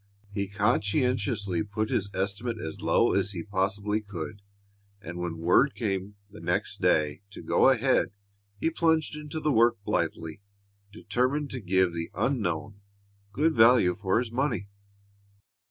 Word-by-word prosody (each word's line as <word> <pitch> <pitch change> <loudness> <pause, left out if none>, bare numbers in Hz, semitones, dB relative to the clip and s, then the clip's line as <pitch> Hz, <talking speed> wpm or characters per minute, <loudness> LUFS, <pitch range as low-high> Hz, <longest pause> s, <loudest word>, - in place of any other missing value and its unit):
He 100 -1 -2
conscientiously 105 - 0
put 110 +1 -3
his 100 -1 0
estimate 100 +5 -2
as 80 -6 -6
low - - +3
as 105 - +1
he 85 -3 -4
possibly 100 +2 -1
could, 100 -2 -7 0.6
and 85 -2 -7
when 85 -2 -3
word 90 - +3
came 100 -3 -2 0.2
next 90 +1 -2
day 75 0 +2
to 100 - -10
go - - +4
ahead 130 0 +3 0.5
he 165 - +1
plunged 160 -2 +1
into 150 +1 -6
the 155 -1 0
work 115 -1 +4
blithely, 80 -2 -2 0.5
determined 130 +7 -1
to 130 - -4
give 95 -2 +2
the 85 0 -4
unknown 100 - -2 0.5
good 155 +9 +1
value 115 -5 +5
for 95 +1 0
his 115 -1 -1
money. 125 -5 -1
105 Hz, 140 wpm, -27 LUFS, 95-125 Hz, 0.6 s, value